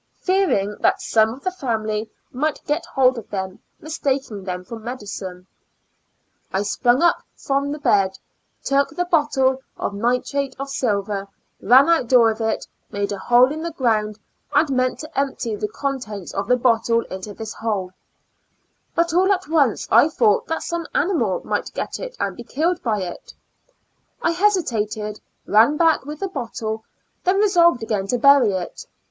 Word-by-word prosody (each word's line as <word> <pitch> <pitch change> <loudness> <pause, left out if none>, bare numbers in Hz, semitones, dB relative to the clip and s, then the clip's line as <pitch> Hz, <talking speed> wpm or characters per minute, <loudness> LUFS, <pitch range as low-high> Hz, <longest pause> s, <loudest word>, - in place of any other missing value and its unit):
Fearing 365 - +1
that - - +2
some 220 -1 +3
of 260 +4 -10
the 370 - 0
family 220 - -2 0.2
might 300 +4 -2
get 300 +3 -1
hold 260 -2 +2
of 220 - -13
them, 190 -1 -4 0.2
mistaking 275 -9 -3
them 180 -1 -4
for 230 +4 -8
medicine, 200 -6 -7 1.1
I 195 +2 0
sprung 245 +7 +2 0.3
from 280 +1 -1
the 295 - -3
bed, 195 -9 +2 0.5
took 275 0 +2
the 355 - 0
bottle 275 -6 +2 0.2
of - - -3
nitrate 250 +5 -1
of 275 0 -5
silver, 200 -6 -1 0.3
ran 260 +4 +6
out 335 -7 +3
door 235 -2 +6
with 220 +1 -3
it, 220 0 -1 0.2
made 200 0 -2
a 200 - -4
hole 245 +5 +5
in 310 +1 -4
the 335 - -3
ground, 215 -6 0 0.4
and 310 - +4
meant 255 -1 +1
to 310 -1 -4
empty 260 -5 -2
the 210 - -2
contents 215 -5 -5
of 195 0 -2
the 250 - +4
bottle 230 -1 +2
into 190 0 -8
this 220 -1 -6
hole; 205 -5 -3 1.0
but 335 0 +1
all 375 +3 +4
at 375 -3 0
once 290 -8 +2
I 235 +8 +6
thought 220 -9 +2
that 325 - -2
some 340 -2 -3
animal 270 - +1
might - - -3
get - - -4
it - - -7
and - - -2
be - - -9
killed 335 +4 -1
by 215 -5 -1
it. 175 - -8 0.8
I 335 - +1
hesitated, 225 - 0 0.2
ran 225 +8 +4
back 325 -4 +3
with 300 0 -7
the 390 - 0
bottle, 225 - -5 0.4
then 370 +2 +2
resolved 345 - +4
again 205 -3 -2
to 245 - 0
bury 265 -4 +5
it. 185 -2 -5
245 Hz, 165 wpm, -21 LUFS, 210-300 Hz, 1.1 s, ran